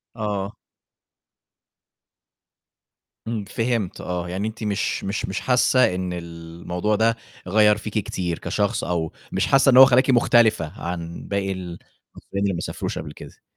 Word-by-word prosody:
آه. 105 -3 -3 2.7
امم، 115 -2 -2
فهمت 115 -2 -2
آه، 90 -1 -4
يعني 95 +4 -2
أنتِ 110 +1 -7
مش 105 -2 -1
مش 100 +2 -2
مش 95 - -3
حاسّة 125 -5 +3
إن 90 -1 -3
الموضوع 85 +3 -4
ده 115 +2 +2 0.3
غيّر 105 +2 +4
فيكِ 105 0 -7
كتير 90 -4 -3
كشخص، - - -1
أو 85 -3 -2 0.2
مش - - 0
حاسّة 135 0 +4
إن 125 - +5
هو 130 - +12
خلّاكِ 130 +1 +3
مُختلفة 110 - +3
عن 85 -1 -5
باقي 100 -1 -1
ال 90 -2 -6 0.4
حرفيًا 100 - -6
اللي 100 -1 +1
ما 85 - -3
سافروش - - -4
قبل 75 -2 -7
كده. - - -13
100 Hz, 145 wpm, -23 LUFS, 90-110 Hz, 2.7 s, هو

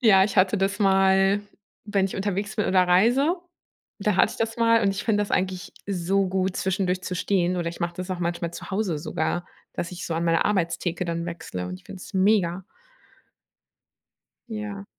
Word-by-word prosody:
ja, 195 -6 +6
ich 205 0 -3
hatte 185 +2 +4
das 195 +2 0
mal 195 0 +4 0.4
wenn 200 -2 +1
ich 195 - -3
unterwegs 205 +2 -2
bin 210 - 0
oder 185 -1 +4
reise, 240 - +4 0.7
da 205 -1 +1
hatte 215 - +4
ich - - -9
das 225 0 -2
mal 230 0 +4
und 200 - +3
ich 195 - -3
finde 210 -2 +2
das 205 - -3
eigentlich 185 -1 -1
so 195 0 0
gut 190 0 -1
zwischendurch 185 -1 0
zu 180 - -3
stehen, 180 0 +1
oder 170 -1 -1
ich 170 - -10
mache 170 0 -2
das 185 +1 -6
auch 185 - -2
manchmal 170 -1 -2
zu 180 - -9
Hause 190 -6 0
sogar, 175 +2 -2 0.3
dass 170 - -4
ich 180 - -7
so 165 - -2
an 165 - -1
meine 165 -1 +3
Arbeitstheke 175 -2 0
dann 170 0 -3
wechsle 125 - -5
und 90 - -5
ich 90 - -15
finde 185 - -10
es - - -12
mega. 190 -2 +2 1.9
Ja. 210 -2 -5
190 Hz, 195 wpm, -25 LUFS, 175-205 Hz, 1.9 s, ja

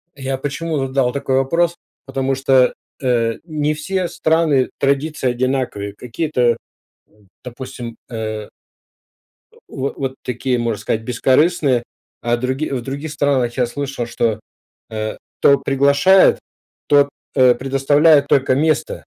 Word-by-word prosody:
Я 135 -1 -3
почему, 145 +2 -3
э, - - -5
дал 130 -2 +1
такой 135 0 -1
вопрос? 165 +6 +1 0.3
Потому 135 0 -1
что, 130 -1 +3 0.3
э, 115 -3 +1
не 155 -2 -1
все 185 +4 -2
страны 160 -6 +1
традиции 140 0 0
одинаковые. 125 -5 -2
Какие-то, 125 -1 0 0.5
м, 105 -2 -27 0.2
допустим, 125 -1 -8
э 110 -2 -4 1.0
э, - - -25
во 135 +1 -4
вот 135 -1 -4
такие, 125 +1 -1
можно 115 -3 -1
сказать, 110 +1 -1
бескорыстные. 130 +2 +2 0.4
А 120 0 +1
други 130 +5 -2
в 130 -3 -2
других 140 +5 -5
странах 135 -4 0
я 125 - +3
слышал, 135 -1 -4
что, 115 -2 -1 0.5
э, 110 0 -4 0.2
кто 140 - +5
приглашает, 140 +7 +4 0.5
тот, 145 -1 +4 0.3
э, 125 -1 +6
предоставляет 140 +3 +3
только 135 -2 +3
место. 155 +2 0
135 Hz, 130 wpm, -19 LUFS, 125-145 Hz, 1.0 s, э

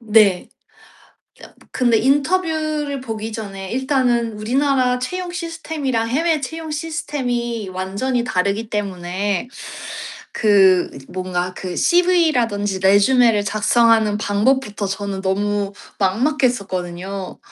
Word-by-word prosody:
네. 215 -5 +3
저 - - -37 1.1
근데 240 -3 +3
인터뷰를 305 0 0
보기 225 -3 -5
전에 195 -4 -6
일단은 250 -3 +1
우리나라 250 +3 +1
채용 360 +7 -4
시스템이랑 320 -9 -3
해외 315 +5 +1
채용 320 +3 -6
시스템이 250 - -3
완전히 200 +7 -1
다르기 200 0 -1
때문에 195 +1 -2 0.8
그 190 -4 +4 0.2
뭔가 185 -1 -3
그 180 -2 -5
CV라든지 270 - +2
resume를 205 +2 +4
작성하는 215 0 +3
방법부터 210 0 0
저는 195 0 -3
너무 200 +1 0 0.3
막막했었거든요. 195 - -1
225 Hz, 265 characters per minute, -20 LUFS, 200-270 Hz, 1.1 s, 그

